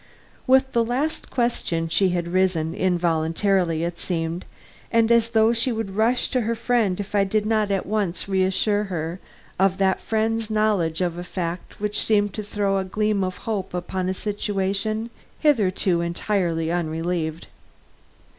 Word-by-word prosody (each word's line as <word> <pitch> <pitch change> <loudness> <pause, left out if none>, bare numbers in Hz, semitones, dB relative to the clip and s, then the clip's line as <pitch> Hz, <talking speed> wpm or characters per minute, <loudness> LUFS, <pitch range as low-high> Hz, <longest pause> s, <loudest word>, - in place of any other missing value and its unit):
With 265 +1 +4
the 235 - +2
last 265 +7 -2
question 235 -9 0
she 185 +4 +2
had 175 -1 -1
risen, 185 -4 +1
involuntarily, 170 0 +1
it 170 0 -3
seemed, 165 0 -3 0.5
and 230 0 +3
as 230 -1 +4
though 225 0 +4
she 235 +2 +2
would 220 -4 -4
rush 230 +4 +2
to 255 - +1
her 230 +1 -1
friend 230 -5 +1
if 205 - -5
I 200 -1 +4
did 210 +2 0
not 215 -1 +1
at 195 -2 0
once 200 -4 -1
reassure 195 +2 +1
her 170 -2 -4 0.4
of 190 -1 +3
that 190 -1 +1
friend's 225 0 -1
knowledge 205 -7 +1
of 175 -1 -1
a - - -4
fact 175 -1 -5
which 210 0 -1
seemed 205 -2 +2
to 215 - -3
throw 200 -1 0
a - - -1
gleam 210 +1 0
of 185 0 -3
hope 200 -5 -3
upon 180 +1 -2
a - - 0
situation 205 +2 -2 0.3
hitherto 195 - +2
entirely 170 -2 -1
unrelieved. 165 -1 -2
195 Hz, 155 wpm, -23 LUFS, 175-220 Hz, 0.5 s, With